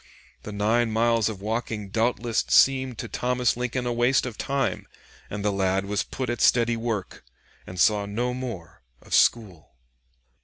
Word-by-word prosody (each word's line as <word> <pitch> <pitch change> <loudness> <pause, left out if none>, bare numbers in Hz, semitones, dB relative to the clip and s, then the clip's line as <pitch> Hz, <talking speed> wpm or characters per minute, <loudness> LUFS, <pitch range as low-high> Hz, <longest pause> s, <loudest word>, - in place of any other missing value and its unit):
The 105 - -8
nine 110 +3 +1
miles 115 0 +2
of 100 -3 -7
walking 110 -2 -3
doubtless 115 +1 0
seemed 130 -3 +3
to - - -5
Thomas 125 -1 0
Lincoln 125 +1 -3
a 120 - -1
waste 120 +3 +2
of 125 -3 -5
time, 135 -6 -2 0.4
and 105 0 -5
the 105 - +2
lad 95 0 0
was 105 +1 -1
put 130 -1 -5
at 120 0 -3
steady 120 -1 +4
work 115 -4 -4 0.4
and 90 0 -8
saw 105 +2 +3
no 120 +5 -2
more 100 -8 -7 0.2
of - - -9
school. 95 - +1
115 Hz, 160 wpm, -25 LUFS, 105-125 Hz, 0.4 s, steady